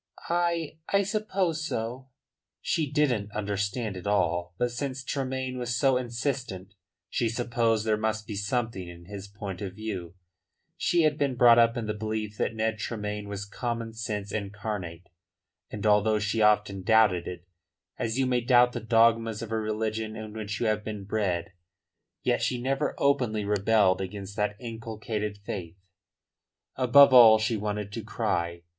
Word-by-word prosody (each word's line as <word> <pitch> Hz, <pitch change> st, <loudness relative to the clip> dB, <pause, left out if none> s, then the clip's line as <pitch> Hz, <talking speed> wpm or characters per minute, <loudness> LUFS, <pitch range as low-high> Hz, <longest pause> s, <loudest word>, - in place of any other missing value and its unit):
"I 170 Hz, -2 st, 0 dB
I 200 Hz, 0 st, +3 dB
suppose 190 Hz, -5 st, -1 dB
so." 120 Hz, +1 st, -4 dB, 0.5 s
She 155 Hz, -4 st, -1 dB
didn't 125 Hz, -9 st, +1 dB
understand 105 Hz, +1 st, -2 dB
it 95 Hz, +2 st, -7 dB
all. 85 Hz, -3 st, 0 dB
But 120 Hz, 0 st, 0 dB
since 130 Hz, +2 st, -4 dB
Tremayne 130 Hz, -1 st, -3 dB
was 120 Hz, -1 st, -2 dB
so 135 Hz, +2 st, +3 dB
insistent 120 Hz, -6 st, -3 dB, 0.3 s
she 115 Hz, -, 0 dB
supposed 115 Hz, -2 st, 0 dB
there 110 Hz, -1 st, +2 dB
must 110 Hz, 0 st, -1 dB
be 105 Hz, -, -6 dB
something 100 Hz, -2 st, -2 dB
in 85 Hz, 0 st, -11 dB
his 100 Hz, +1 st, -8 dB
point 100 Hz, -2 st, -7 dB
of 95 Hz, -2 st, -5 dB
view. 95 Hz, -6 st, -5 dB, 0.6 s
She 175 Hz, -1 st, +2 dB
had 150 Hz, -1 st, +2 dB
been 140 Hz, -3 st, +1 dB
brought 120 Hz, -1 st, +7 dB
up 115 Hz, +1 st, +4 dB
in 115 Hz, -, -2 dB
the 105 Hz, -, -2 dB
belief 110 Hz, 0 st, -4 dB
that 115 Hz, -, 0 dB
Ned 110 Hz, 0 st, -1 dB
Tremayne 105 Hz, -1 st, -4 dB
was 100 Hz, 0 st, -4 dB
common 115 Hz, +1 st, -4 dB
sense 105 Hz, -3 st, -4 dB
incarnate; 100 Hz, -4 st, -5 dB, 0.6 s
and 105 Hz, 0 st, -6 dB
although 105 Hz, +1 st, +4 dB
she 105 Hz, +1 st, -1 dB
often 105 Hz, -2 st, +3 dB
doubted 105 Hz, -4 st, +3 dB
it 90 Hz, -1 st, -7 dB, 0.5 s
as 115 Hz, -1 st, -1 dB
you 135 Hz, -, +2 dB
may 125 Hz, -1 st, +1 dB
doubt 120 Hz, +1 st, +5 dB
the 120 Hz, -, -4 dB
dogmas 115 Hz, 0 st, +3 dB
of 115 Hz, -, -8 dB
a 110 Hz, -, 0 dB
religion 110 Hz, 0 st, -2 dB
in 110 Hz, -1 st, -7 dB
which 105 Hz, -2 st, -4 dB
you -, -, 0 dB
have 105 Hz, -1 st, +1 dB
been 105 Hz, -2 st, -5 dB
bred 95 Hz, -4 st, -2 dB, 0.7 s
yet -, -, +1 dB
she 125 Hz, -, 0 dB
never 135 Hz, +4 st, -1 dB
openly 125 Hz, -7 st, +1 dB
rebelled 100 Hz, -2 st, +3 dB
against 100 Hz, +1 st, -6 dB
that 105 Hz, -1 st, 0 dB
inculcated 110 Hz, -3 st, -4 dB
faith. 90 Hz, -4 st, -5 dB, 1.0 s
Above 135 Hz, +2 st, +7 dB
all 115 Hz, -3 st, +9 dB
she 110 Hz, +1 st, 0 dB
wanted 105 Hz, -1 st, -3 dB
to 115 Hz, +1 st, -5 dB
cry. 85 Hz, -6 st, -2 dB
110 Hz, 160 wpm, -27 LUFS, 100-120 Hz, 1.0 s, all